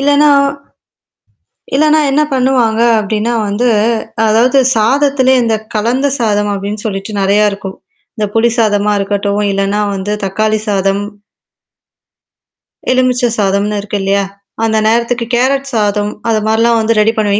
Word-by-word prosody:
இல்லன்னா 290 +1 +3 1.5
இல்லனா 310 +2 +3
என்ன 295 +3 +2
பண்ணுவாங்க 250 -4 +1 0.2
அப்ப்டின்னா 215 +3 -2
வந்து, 205 +5 0 0.6
அதாவது 240 +5 +3 0.2
சாதத்திலேயே 260 +2 +2
இந்த 225 -1 +1 0.2
கலந்த 240 +6 0
சாதம் 205 -3 0
அப்ப்டின்னு 200 +2 -5
சொல்லிட்டு 195 0 -4
நெறைய 205 +2 +3
இருக்கும். 195 -1 -7 0.4
இந்த 215 -3 -1
புளி 230 +1 +3
சாதமா 210 -2 +1
இருக்கட்டும், 200 +1 -1
இல்லன்னா 195 +1 -1
வந்து 195 +2 -3
தக்காளி 215 +3 0
சாதம் 195 0 0 1.9
எலுமிச்ச 255 -1 +1
சாதம்னு 205 0 0
இருக்கு 205 +1 -4
இல்லையா? 200 +1 +1 0.4
அந்த 220 -1 +1
நேரத்துக்கு 235 +1 0
கேரட் 270 +3 +1
சாதம், 210 -2 0 0.2
அது 220 -1 +2
மாரிலாம் 230 +1 +2
வந்து 225 0 0
ரெடி 215 +1 +3
பண்ணுவேன். 205 -1 +1
215 Hz, 125 wpm, -13 LUFS, 205-245 Hz, 1.9 s, இல்லன்னா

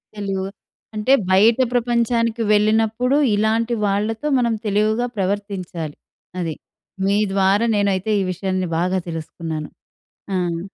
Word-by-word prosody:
తెలివు 195 -2 -3 0.5
అంటే 215 +5 +2 0.2
బయట 220 +5 +5 0.2
ప్రపంచానికి 235 -1 +1
వెళ్ళినప్పుడు 220 +5 +2 0.2
ఇలాంటి 225 +3 +1
వాళ్ళతో 215 +7 -1
మనం 235 -2 +1
తెలివిగా 215 +3 +1
ప్రవర్తించాలి. 185 -5 -3 0.4
అది. 165 -4 -2 0.5
మీ 200 +1 +2 0.2
ద్వారా 195 +3 +3
నేనైతే 200 0 0
ఈ - - 0
విషయాన్ని 185 0 -2
బాగా 180 +3 +1
తెలుసుకున్నాను. 160 -1 -5 0.7
ఆహ్, 175 -2 -1
205 Hz, 105 wpm, -21 LUFS, 185-225 Hz, 0.7 s, బయట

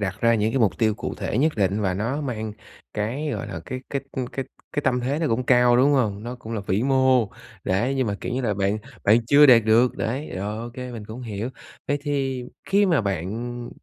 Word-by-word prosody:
đặt 95 0 -3
ra 115 0 +4
những 110 +1 +1
cái 135 - +1
mục 110 -5 +2
tiêu 110 -2 +2
cụ 120 - -5
thể 110 - -2
nhất 155 +2 +3
định 100 +1 +1
và 95 -3 0
nó 115 +10 -2
mang 110 -6 -3 0.4
cái, 125 +9 -2
gọi - - -4
là, - - -6
cái 130 0 -5
cái, 140 - -1
ư, 130 - -2
cái 135 - -3 0.3
cái 145 - -1
tâm 125 -1 +1
thế 135 +5 -1
nó 165 - 0
cũng 115 +3 +1
cao, 125 -1 +5
đúng 135 +3 +5
hông? 105 -7 +1
Nó 120 +2 -5
cũng 115 -2 -9
là 110 - -2
vĩ 100 +5 +1
mô, 130 -4 +3 0.4
đấy, 115 +9 +1
nhưng 130 -3 0
mà, 100 - -1
kiểu - - -4
như 130 - -1
là, 110 -5 0
bạn 100 +2 0 0.3
bạn 110 +3 +4
chưa 145 +3 +7
đạt 115 -4 +7
được, 115 +3 +4
đấy, 130 +7 -3
rồi 105 +3 -3
ô 120 +1 -6
kê 125 -1 -6
mình 115 -3 -7
cũng 110 +4 -8
hiểu. 110 0 -4 0.4
Vậy 145 - +1
thì 135 -4 -1 0.2
khi 200 +1 +4
mà 165 -8 +3
bạn 110 +6 -3
120 Hz, 245 wpm, -24 LUFS, 105-130 Hz, 0.4 s, chưa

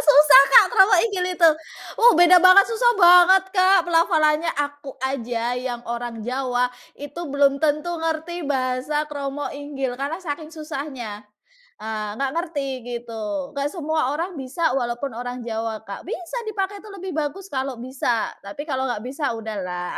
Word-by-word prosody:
susah 290 -1 +8
Kak - - +9
kromo 390 -2 +6
inggil 395 -5 -1
itu, 330 -2 +6 0.5
uh, 475 +1 +7
beda 350 +1 +7
banget 370 +2 +8
susah 480 +2 +3
banget 360 +1 +7
Kak 370 -2 +4
pelafalannya 330 -2 +2
aku 285 -1 -5
aja 240 -3 -2
yang 245 -1 -5
orang 235 -2 -5
Jawa 250 0 -1 0.2
itu 290 +4 -8
belum 280 0 +2
tentu 305 +3 0
ngerti 325 +1 -3
bahasa 265 +3 -1
kromo 285 -1 -5
inggil 280 -3 -5
karena 285 +4 -2
saking 305 -2 -6
susahnya, 275 -9 -7 0.6
eee, 215 -1 -4
nggak 275 -1 -1
ngerti 320 -5 -3 0.2
gitu 235 +1 -5
nggak 280 +1 -1
semua 315 -5 -1
orang 345 +4 -4
bisa 270 +4 -1
walaupun 240 +1 -3
orang 245 +1 -6
Jawa 225 -1 -4
Kak 200 - -8
bisa 380 +1 -5
dipakai 400 -1 -3
itu 430 - -14
lebih 380 -1 -7
bagus 310 +6 -3
kalau 265 -1 -3
bisa 245 -2 -2
tapi 200 +9 -7
kalau 265 -2 -1
nggak 240 -2 -4
bisa 275 +2 -3
udahlah 185 -5 -5
285 Hz, 155 wpm, -22 LUFS, 245-335 Hz, 0.6 s, Kak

